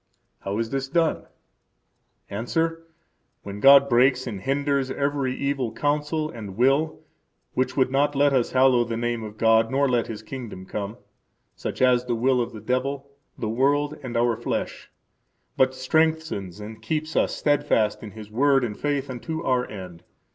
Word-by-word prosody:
How 100 +1 -4
is 115 0 -2
this 135 0 -2
done? 165 +3 0 1.0
–Answer: 165 +10 -2 0.6
When 100 0 -7
God 140 +4 +8
breaks 130 +1 +3
and 105 -6 -5
hinders 140 +2 0
every 140 -1 -1
evil 140 -4 -1
counsel 150 +1 -1
and 105 -4 -8
will 135 +6 +2 0.5
which 130 +1 -1
would 130 -1 +2
not 145 +2 +2
let 140 0 +3
us 125 -3 +2
hallow 130 -2 +5
the 115 -1 -4
name 120 0 -1
of 105 0 -8
God 115 0 +4
nor 140 +2 +2
let 120 -3 +1
His 110 -1 -7
kingdom 110 -6 -8
come, 105 +3 -5 0.6
such - - -3
as 125 -1 +4
the 120 -1 -1
will 125 +2 +2
of 120 - -3
the 110 -3 -9
devil, 135 +4 -2 0.3
the 110 - -3
world, 145 +6 +1
and 125 -3 -4
our 120 0 +2
flesh; 120 - -4 0.7
but 130 0 +2
strengthens 155 - 0
and 110 +1 -9
keeps 155 +6 -3
us - - +1
steadfast 145 -7 +1
in 110 - -7
His 105 0 -11
Word 135 +3 +3
and 110 -4 -3
in - - -19
faith 145 -2 -1
unto 160 +6 -5
our 125 -3 0
end. 90 -5 -9
130 Hz, 170 wpm, -24 LUFS, 115-140 Hz, 1.0 s, God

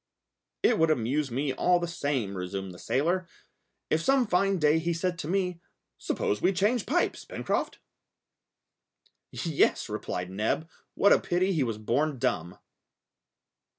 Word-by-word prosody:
"It 235 - +4
would 160 0 +4
amuse 140 +1 0
me 135 +3 -1
all 175 +6 +3
the 175 - -2
same," 140 - -2
resumed 95 +1 -4
the 90 - -13
sailor, 170 +6 0 0.6
"if 160 - +2
some 270 +6 +3
fine 195 -1 +2
day 155 0 +3
he 170 +1 -1
said 175 +1 -2
to 150 - -4
me, 180 -1 -1 0.4
'Suppose 105 - -1
we 195 - +3
change 205 +5 +1
pipes, 350 +7 0
Pencroft.'" - - -2 1.5
"Yes," 160 -7 +1
replied 90 -4 -4
Neb, 110 +11 -1 0.3
"what 200 - +5
a - - +4
pity 185 +2 0
he 160 - +1
was 115 -5 -1
born 135 +7 0
dumb!" 90 -9 -1
155 Hz, 145 wpm, -28 LUFS, 120-180 Hz, 1.5 s, what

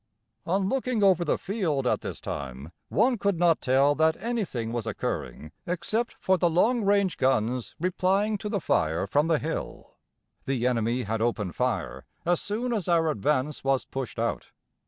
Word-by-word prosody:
On 190 +2 +1
looking 250 -2 0
over 185 -3 +5
the 160 - +1
field 170 - -1
at - - +1
this - - -6
time 70 +2 -6 0.2
one 245 -2 +2
could 200 -3 +1
not 170 -1 +3
tell 135 +3 +4
that 160 +1 +2
anything 200 - -2
was 115 -2 -3
occurring 75 - -4 0.2
except 180 +7 -1
for 190 -1 +2
the 175 - +3
long 220 +8 +2
range 200 -2 +2
guns 125 -1 0
replying 190 +4 +1
to 210 - -4
the 205 -2 0
fire 80 - +1
from 145 +10 +1
the 165 -2 +3
hill. 160 +2 -5 0.5
The 130 -3 -1
enemy 120 0 +1
had 110 +1 -2
opened 105 -7 -1
fire 65 +1 -2 0.2
as 175 0 +2
soon 235 +4 -2
as 205 -6 -2
our 165 -2 +3
advance 145 +4 -1
was 135 -1 +1
pushed 135 -2 -5
out. 115 +1 -2
160 Hz, 170 wpm, -27 LUFS, 120-195 Hz, 0.5 s, over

